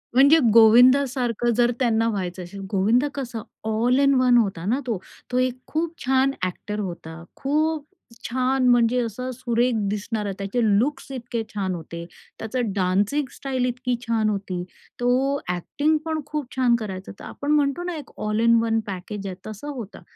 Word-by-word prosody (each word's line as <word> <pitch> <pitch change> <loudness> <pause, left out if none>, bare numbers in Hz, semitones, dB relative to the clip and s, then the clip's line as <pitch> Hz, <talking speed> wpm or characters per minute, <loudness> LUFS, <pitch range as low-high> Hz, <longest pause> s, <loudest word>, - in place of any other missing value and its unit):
म्हणजे 280 +5 +7 0.2
गोविंदासारखं 245 +1 +5
जर 240 0 +4
त्यांना 230 -3 +2
व्हायचं 185 -3 -3
असेल. 180 +3 -9
गोविंद 220 +7 +3
कसं 240 -5 -5 0.2
ऑल 230 +4 +2
इन 275 0 +4
वन 250 -1 +5
होता 195 -7 0
ना 240 +7 +1
तो. 230 -4 0 0.3
तो 250 - 0
एक 255 0 0
खूप 325 +1 -2
छान 265 +1 +3 0.2
एक्टर 210 +3 -5
होता, 170 -4 -6
खूप 305 +2 0 0.4
छान 255 +1 +1
म्हणजे 240 0 +4
असा 240 +2 -4
सुरेख 240 0 0 0.2
दिसणारा, 210 0 -2
त्याचे 200 +5 -1
लुक्स 245 +7 +1
इतके 240 -2 -4
छान 190 -3 -2
होते. 170 0 -7 0.3
त्याचं 225 0 -2
डान्सिंग 200 +9 +1
स्टाईल 260 -2 -2
इतकी 250 0 -1
छान 225 -3 +1
होती, 195 -3 -3 0.4
तो 260 +3 +2 0.2
एक्टिंगपण 310 - -1
खूप 300 -1 -3
छान 250 -2 +3
करायचा. 190 -3 -6
तर - - -11
आपण 285 +1 -4
म्हणतो 290 +2 +2
ना 355 -1 -3
एक 290 - -10
ऑल 215 0 0
इन 230 0 +5
वन 225 -1 +1
पॅकेज 200 +1 -5
आहे 185 - -5
तसं 215 +6 -8
होतं. 220 -5 -8
240 Hz, 160 wpm, -23 LUFS, 210-265 Hz, 0.4 s, म्हणजे